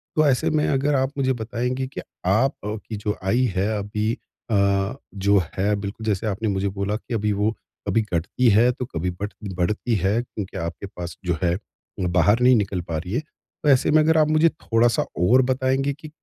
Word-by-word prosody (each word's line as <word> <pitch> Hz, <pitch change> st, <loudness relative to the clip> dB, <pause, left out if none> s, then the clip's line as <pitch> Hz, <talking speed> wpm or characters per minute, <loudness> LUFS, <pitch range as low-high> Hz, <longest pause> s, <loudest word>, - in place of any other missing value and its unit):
तो 155 Hz, -1 st, +4 dB
ऐसे 130 Hz, -2 st, +2 dB
में 155 Hz, -1 st, +1 dB
अगर 140 Hz, +1 st, +1 dB
आप 130 Hz, +1 st, +1 dB
मुझे 130 Hz, -1 st, +2 dB
बताएँगी 125 Hz, +3 st, -2 dB
कि 135 Hz, -, -7 dB, 0.2 s
आपकी 110 Hz, 0 st, 0 dB
जो 105 Hz, 0 st, -2 dB
आय 115 Hz, +6 st, +2 dB, 0.2 s
है 95 Hz, +3 st, +1 dB
अभी 105 Hz, +2 st, -1 dB, 0.4 s
अ, 100 Hz, +1 st, +2 dB, 0.2 s
जो 100 Hz, +1 st, +3 dB, 0.2 s
है 100 Hz, +2 st, +2 dB
बिल्कुल 100 Hz, +2 st, -6 dB
जैसे 105 Hz, 0 st, 0 dB
आपने 110 Hz, +2 st, -2 dB
मुझे 100 Hz, 0 st, 0 dB
बोला 100 Hz, +1 st, -2 dB
कि 115 Hz, +3 st, -6 dB
अभी 105 Hz, -1 st, +1 dB
वो 105 Hz, +2 st, +1 dB, 0.4 s
कभी 115 Hz, -, +3 dB
घटती 100 Hz, +9 st, +2 dB
है 115 Hz, +4 st, +5 dB
तो 125 Hz, 0 st, -5 dB
कभी 85 Hz, +3 st, -1 dB
बढ़ 105 Hz, -, -1 dB, 0.2 s
बढ़ती 105 Hz, +6 st, 0 dB
है 100 Hz, +4 st, +1 dB
क्योंकि 105 Hz, -5 st, -7 dB
आपके 85 Hz, +3 st, -4 dB
पास 85 Hz, -1 st, -6 dB
जो 90 Hz, -2 st, 0 dB
है, 85 Hz, 0 st, +2 dB, 0.4 s
बाहर 90 Hz, +4 st, +3 dB
नहीं 125 Hz, 0 st, +6 dB
निकल 100 Hz, -4 st, 0 dB
पा 85 Hz, -2 st, -4 dB
रही 90 Hz, +5 st, -5 dB
है। 125 Hz, -, +2 dB, 0.4 s
तो 150 Hz, -, +3 dB
ऐसे 135 Hz, 0 st, +4 dB
में 155 Hz, -, +6 dB
अगर 160 Hz, +1 st, +3 dB
आप 155 Hz, -1 st, +5 dB
मुझे 155 Hz, +2 st, +4 dB
थोड़ा-सा 115 Hz, -5 st, +1 dB, 0.2 s
और 120 Hz, +9 st, +5 dB
बताएँगे 135 Hz, +2 st, +1 dB
कि 150 Hz, +1 st, -11 dB
110 Hz, 195 wpm, -23 LUFS, 100-130 Hz, 0.4 s, नहीं